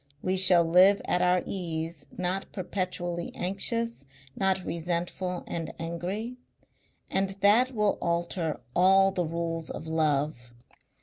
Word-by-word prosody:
We 185 +1 +1
shall 185 -2 +6
live 185 +4 +6
at 180 - +1
our 180 0 +3
ease, 165 -4 -4
not 185 +2 -2
perpetually 180 -2 -3
anxious, 200 - -2 0.3
not 190 -1 +1
resentful 175 +2 -3
and 165 -2 -4
angry. 180 +9 -4 0.7
And 195 0 +1
that 235 +6 +4
will 210 -1 +1
alter 170 -1 -1 0.2
all 195 +2 +5
the 180 -3 -1
rules 165 -1 -3
of 155 - -6
love. 150 -6 -1
180 Hz, 120 wpm, -28 LUFS, 165-195 Hz, 0.7 s, shall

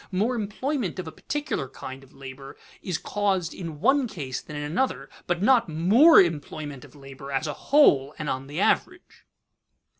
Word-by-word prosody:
More 210 +7 +1
employment 230 - -3
of 185 - -4
a - - -6
particular 290 - -4
kind 130 +1 -9
of 135 - -19
labor 135 0 -11 0.2
is 180 -4 -2
caused 195 -5 -1
in 165 -5 -7
one 270 - +3
case 140 - -5
than 150 - -10
in 145 - -4
another, 185 - -2 0.2
but 175 +1 -1
not 235 -4 +4
more 205 - +6
employment 150 -4 -1
of - - -16
labor 135 0 -10
as 135 +3 -1
a 150 - -3 0.2
whole 150 - +5
and 155 - -5
on 130 0 -3
the 145 +4 -5
average. - - -1
165 Hz, 175 wpm, -25 LUFS, 140-210 Hz, 0.2 s, more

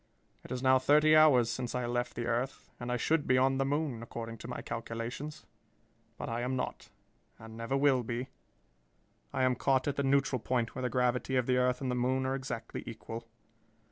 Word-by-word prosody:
It - - -12
is 125 0 -3
now 130 0 +5
thirty 150 +4 +5
hours 145 -7 +6
since 125 0 -3
I 125 -1 -1
left 120 +1 -2
the 120 - -3
earth 120 +3 -2
and 120 0 -4
I 125 - +1
should 155 +5 +1
be 130 - +4
on 135 +1 +3
the 135 - +2
moon, 145 -4 -1
according 115 -1 -7
to - - -8
my 125 - -5
calculations. 115 +6 -5 0.7
But - - -5
I 115 +1 -2
am 125 +2 -1
not, 125 - -4 0.5
and 110 0 -11
never 115 +4 -1
will 135 -2 +4
be. 120 +2 -4 1.0
I - - 0
am 130 0 +4
caught 130 +2 +1
at 145 - -1
the 140 - +1
neutral 135 -1 +2
point 120 0 -1
where 130 - -5
the 125 - 0
gravity 125 +1 +1
of 125 -2 +2
the 125 0 +2
earth 125 +1 +2
and 130 -2 -1
the - - 0
moon 130 +2 +1
are 130 - 0
exactly 130 -4 -5
equal. 115 +1 -7
125 Hz, 205 wpm, -31 LUFS, 120-135 Hz, 1.0 s, hours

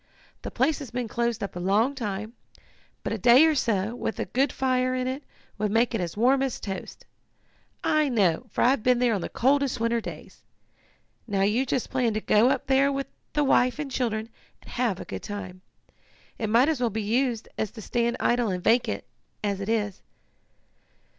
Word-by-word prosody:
The - - -5
place 275 +5 +1
has 280 -5 -7
been 245 -1 -3
closed 235 0 -1
up 200 - -5
a - - -4
long 205 +9 +2
time, 215 -3 -4 0.7
but - - -2
a 225 - -3
day 245 - +7
or 320 - +4
so, 225 -6 0
with 240 - -4
a - - -1
good 265 +2 +1
fire 255 -1 0
in 255 0 -1
it, 260 +2 -3 0.4
would 210 0 0
make 230 +3 +2
it 225 - 0
as 175 +2 -4
warm 260 +4 +4
as 270 -3 -1
toast. 195 -2 -7 0.8
I 305 -2 +2
know, 205 -3 +1
for - - 0
I've 255 0 +3
been 250 +2 +3
there 245 -1 +2
on 200 - -1
the - - -4
coldest 275 0 +1
winter 230 0 +1
days. - - -9 0.9
Now 200 -3 0
you 230 +7 +1
just 250 - -1
plan 245 -4 +1
to - - +1
go 220 +3 +4
up - - 0
there 275 +1 +3
with 275 0 -2 0.3
the 295 - +2
wife 255 -2 +3
and 295 -2 -4
children, 225 -3 -2 0.3
and - - -13
have 235 -7 0
a - - -7
good - - -6
time. 185 -3 -7 0.8
It 220 - -1
might 235 +5 +5
as 310 -5 0
well 240 - +2
be 220 0 -3
used 235 +1 0
as 220 - 0
to 220 - -11
stand 235 +3 0
idle 240 -2 +2
and 180 -2 -3
vacant, 225 - +2 0.4
as 200 -1 -1
it 200 - -4
is." 210 -4 -1
235 Hz, 200 wpm, -26 LUFS, 210-260 Hz, 0.9 s, day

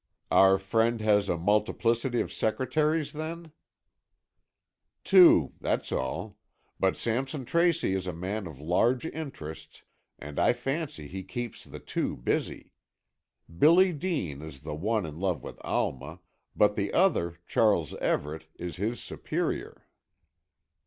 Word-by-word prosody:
"Our 95 0 +6
friend 115 +4 +1
has 105 -2 +3
a 85 - +1
multiplicity 115 +6 +1
of - - -5
secretaries, 150 +7 0
then?" 160 +1 -6 1.5
"Two, 180 - +6
that's - - -1
all. 65 0 -3 0.4
But 95 -1 +2
Sampson 130 +4 -2
Tracy 170 - +2
is 95 -1 -2
a - - -1
man 95 +4 -4
of 75 -5 -10
large 115 - +1
interests, 140 - -7 0.3
and 75 0 -7
I - - +4
fancy 135 - -4
he 95 +5 -6
keeps 115 +6 -6
the - - -10
two - - -3
busy. - - -2 0.9
Billy 180 +4 +6
Dean 145 - -3
is 75 -4 -10
the - - -6
one 105 +7 -1
in 75 0 -8
love 95 -4 -1
with - - -9
Alma, 70 +6 -2 0.3
but 105 0 +4
the 100 - -1
other, 85 - +2
Charles 100 - +2
Everett, 80 +2 -2
is 85 -3 -6
his 110 +5 -2
superior." - - -4
105 Hz, 130 wpm, -28 LUFS, 85-135 Hz, 1.5 s, Our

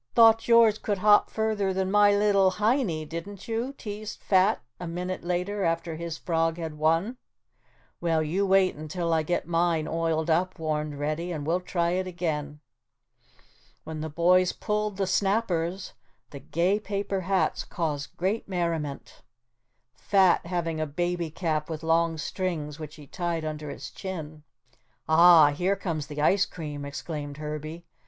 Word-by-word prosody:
"Thought 225 -1 +6
yours 230 -2 +5
could 205 -2 -1
hop 205 +2 +5
further 215 -3 -1
than 190 0 -1
my 205 0 +6
little 200 -2 +4
Heinie, 210 - 0
didn't 170 +5 -7
you?" 235 +4 -2
teased 215 -4 -7
Fat 195 +2 +3 0.2
a 175 - -5
minute 180 +2 -4
later 180 +3 -2
after 165 -1 -1
his 165 0 -5
frog 165 -1 0
had 165 -2 -5
won. 165 +10 +1 0.8
"Well, 165 -2 +1
you 175 +6 0
wait 190 -1 +4
until 165 +3 -3
I 160 - +3
get 175 +3 -2
mine 165 -2 +1
oiled 165 -1 -1
up," 185 +4 +1
warned 155 -2 -2
Reddy, 155 +4 -2
"and 150 -4 -4
we'll 170 +3 +1
try 170 -1 -1
it 185 +1 -1
again." 150 -4 -3 1.2
When 160 -1 -6
the 160 - -4
boys 180 +3 +3
pulled 210 -1 -2
the 195 - +1
snappers, 190 -2 0 0.4
the 140 - -8
gay 175 +9 0
paper 200 -2 -3
hats 190 +1 0
caused 150 -4 -4
great 195 +4 -1
merriment, 165 -6 -3 0.7
Fat 185 +5 +3
having 165 -3 -2
a 155 - -1
baby 175 +2 -2
cap 155 -2 -2
with 160 0 -5
long 165 0 +2
strings 155 -3 -3
which 155 0 -8
he 150 -3 -12
tied 170 +1 -3
under 150 -1 -5
his - - -7
chin. 160 -5 -7 0.7
"Ah, 160 -2 +7
here 180 +7 0
comes 165 -7 -4
the 150 0 -4
ice 200 +5 +3
cream!" 150 -4 -6
exclaimed 145 0 -6
Herbie. 155 +2 -6
170 Hz, 155 wpm, -27 LUFS, 155-195 Hz, 1.2 s, Ah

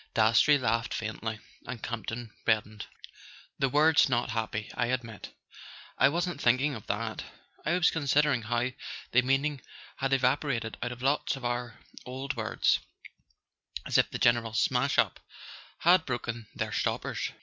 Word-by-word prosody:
Dastrey 115 +7 +5
laughed 115 -2 0
faintly, 110 0 -4 0.3
and 120 -1 -6
Campton 115 0 -5 0.2
reddened. 110 -1 0 0.7
"The 135 - +2
word's 150 +2 +5
not 120 -1 0
happy, 110 -2 -3
I 120 - 0
admit." 120 -4 -4 0.6
"I 135 - +5
wasn't 170 -1 -2
thinking 130 +5 +3
of 110 -5 -9
that: 110 +1 -3 0.4
I 165 - +2
was 180 -1 +4
considering 145 -4 +2
how 120 +3 -1 0.4
the 125 - +5
meaning 135 +2 0 0.4
had 135 0 -1
evaporated 130 -3 +1
out 125 - -2
of 125 +1 -8
lots 140 +1 +1
of 135 -2 -8
our 120 -1 -3 0.3
old 135 +3 -5
words, 110 -2 +1 1.1
as - - +3
if - - +3
the - - -4
general 115 -2 +2
smash - - +1
up - - +2 0.6
had 175 0 +5
broken 120 -3 -4
their - - -2
stoppers. - - -2
125 Hz, 145 wpm, -29 LUFS, 115-140 Hz, 1.1 s, Dastrey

